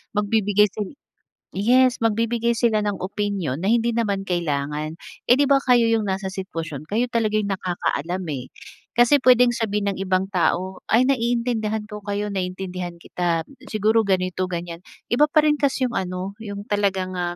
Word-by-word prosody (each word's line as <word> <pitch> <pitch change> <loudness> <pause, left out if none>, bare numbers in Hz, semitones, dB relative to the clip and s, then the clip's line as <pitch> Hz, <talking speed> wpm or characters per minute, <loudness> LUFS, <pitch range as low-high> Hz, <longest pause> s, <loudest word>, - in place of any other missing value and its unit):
magbibigay 210 0 +3
sil 210 +6 -6 0.6
yes, 245 +5 +3
magbibigay 230 +1 +1
sila 225 -2 +2
ng 205 -1 -1
opinyon, 190 -7 -2
na 190 - -1
hindi 235 0 +2
naman 210 -4 -1
kailangan. 155 -3 -2 0.3
Eh, 245 - +7
'di 285 +1 +2
ba, 275 - +6
kayo 245 -2 +4
yung 225 -2 +1
nasa 190 0 -2
sitwasyon, 165 -6 -6
kayo 230 +6 0
talagang 215 -2 +1
yung 200 - 0
nakakaalam, 180 0 -2
eh, 130 -3 -5 0.5
kasi 240 +4 +5
puwedeng 250 -1 +6
sabihin 210 -2 -1
ng - - -10
ibang 185 0 0
tao 185 0 0
"Ay, 230 +4 +4
naiintindihan 235 -4 0
ko 210 - -6
kayo, 205 +1 -1
naiintindihan 185 -2 -4
kita, 170 -1 -1 0.3
siguro 220 +1 +3
ganito, 185 -1 0
ganyan", 170 -1 -5 0.3
iba 290 +6 +4
pa 305 0 +3
rin 300 -1 +4
kasi 270 -2 +1
yung - - -6
ano, 185 +1 -4
yung 200 -2 -6
talagang, 195 -2 0
ah, 175 0 -2
205 Hz, 165 wpm, -23 LUFS, 185-230 Hz, 0.6 s, Eh